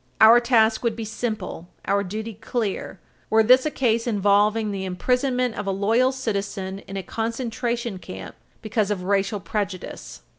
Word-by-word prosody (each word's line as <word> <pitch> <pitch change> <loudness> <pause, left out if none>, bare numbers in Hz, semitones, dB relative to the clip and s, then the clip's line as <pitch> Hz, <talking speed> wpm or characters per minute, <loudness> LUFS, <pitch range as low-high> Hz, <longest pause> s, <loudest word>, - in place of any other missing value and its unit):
Our 225 +2 +9
task 230 -2 +3
would 230 -2 0
be 225 -1 -5
simple, 215 -6 -4 0.2
our 200 0 +1
duty 215 +4 -5
clear, 210 -3 -3 0.3
were 220 0 +5
this 255 +5 +5
a - - +1
case 235 -5 0
involving 210 0 +2
the 195 -1 -3
imprisonment 250 +6 0
of 205 -2 -5
a - - +1
loyal 225 +7 +2
citizen 200 -6 -3
in 195 - -6
a 190 - -3
concentration 230 -1 -3
camp 95 - -8 0.3
because 215 -1 0
of 195 -3 -2
racial 200 +2 0
prejudice. 195 -1 -5
220 Hz, 155 wpm, -24 LUFS, 200-235 Hz, 0.3 s, Our